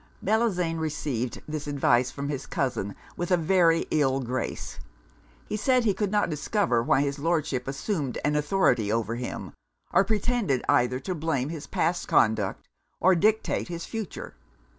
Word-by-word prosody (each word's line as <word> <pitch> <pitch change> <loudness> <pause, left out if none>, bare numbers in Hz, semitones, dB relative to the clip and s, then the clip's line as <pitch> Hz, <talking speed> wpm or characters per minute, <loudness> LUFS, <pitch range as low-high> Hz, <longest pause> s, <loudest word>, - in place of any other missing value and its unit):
Bellozane 185 -6 +1
received 140 -6 -3
this 150 -1 -4
advice 130 -3 +2
from 140 0 -5
his 135 -2 -4
cousin 115 -7 -2 0.2
with 175 - -3
a 180 - +4
very 165 -1 +3
ill 135 -3 +2
grace. 130 0 -4 0.7
He - - -4
said, 250 +3 +2
that - - 0
he 205 - +4
could 205 0 -1
not 210 +1 +2
discover 155 - 0
why 135 - +3
his 140 0 -1
Lordship 155 -5 0
assumed 140 - -2
an 150 0 +2
authority 150 - +2
over 115 0 0
him, 125 - -5 0.4
or 195 - +6
pretended 210 - 0
either 125 +1 +3
to 185 - -3
blame 150 -5 -1
his 160 -3 -6
past 170 +2 0
conduct 110 -3 +2 0.3
or 185 +2 +5
dictate 215 +5 +1
his 170 -1 -5
future. 220 -6 -6
155 Hz, 160 wpm, -27 LUFS, 130-185 Hz, 0.7 s, or